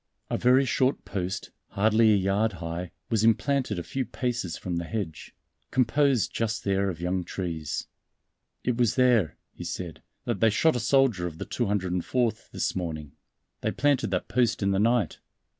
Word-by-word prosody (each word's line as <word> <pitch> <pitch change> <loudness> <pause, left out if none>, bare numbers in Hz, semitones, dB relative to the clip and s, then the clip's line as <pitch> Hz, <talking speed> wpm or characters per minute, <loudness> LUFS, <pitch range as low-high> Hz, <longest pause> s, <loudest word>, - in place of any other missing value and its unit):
A - - +1
very 130 +2 +5
short 130 +1 +1
post, 95 -1 -4 0.2
hardly 110 +2 +4
a - - +5
yard 100 +3 +1
high, 85 +1 -5 0.2
was 110 -2 +2
implanted 120 0 +2
a 85 - -3
few 135 +8 -2
paces 120 -11 -3
from 90 -2 -3
the 85 - -2
hedge, 85 -6 -5 0.3
composed 130 - +2
just 110 -1 -1
there 100 0 +1
of 85 -4 -5
young 90 +1 -1
trees. 85 -5 -4 0.8
"It 125 -2 0
was 120 -3 +2
there," 120 - +3 0.2
he - - -8
said, 85 -1 -5 0.2
"that 120 -5 -1
they 115 - +5
shot 155 +8 +3
a - - 0
soldier 120 -6 +3
of 80 -2 -8
the - - -5
204th 105 +2 -1
this - - -2
morning. 80 -5 -4 0.5
They - - 0
planted 145 -5 +1
that 90 -1 -1
post 120 -2 +1
in 100 - +2
the 95 - +1
night. 115 -4 +2
105 Hz, 170 wpm, -27 LUFS, 90-125 Hz, 0.8 s, very